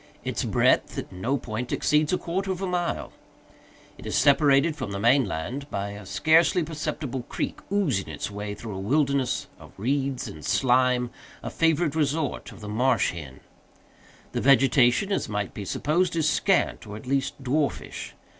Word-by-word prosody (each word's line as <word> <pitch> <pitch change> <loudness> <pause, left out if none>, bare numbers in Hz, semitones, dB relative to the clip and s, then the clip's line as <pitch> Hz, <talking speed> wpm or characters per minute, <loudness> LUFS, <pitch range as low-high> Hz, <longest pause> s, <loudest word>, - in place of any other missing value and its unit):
Its - - -2
breadth - - +2
at - - -5
no 115 +10 -1
point 120 0 -5
exceeds 150 0 +2
a 185 - +2
quarter 190 +3 -3
of 185 - -3
a 195 - -2
mile. 180 -2 -2 0.9
It - - -8
is - - -2
separated 140 +2 +4
from 130 -8 -5
the 100 0 -4
main 125 +5 +4
land 130 - -4
by 100 -3 -3
a 100 -1 -9
scarcely 165 - +3
perceptible 150 -4 -4
creek, - - -3
oozing 160 - 0
its - - -5
way 105 0 -5
through 105 -1 -7
a - - -5
wilderness 135 +4 +1
of - - -15
reeds 135 +4 -1
and 75 - -9
slime, 125 -1 +2 0.3
a - - -4
favorite 165 -2 +2
resort 150 -1 -1
of - - -13
the 105 - -7
marsh 120 +6 +2
hen. 75 -6 -9 0.9
The - - -2
vegetation, 135 - +4
as 195 - -1
might 105 -2 -3
be 100 - -6
supposed, 170 - 0
is 160 -2 +2
scant, 185 - +1
or 105 0 -7
at 110 - -11
least 135 +1 -1
dwarfish. 140 +3 -2
135 Hz, 170 wpm, -26 LUFS, 110-155 Hz, 0.9 s, separated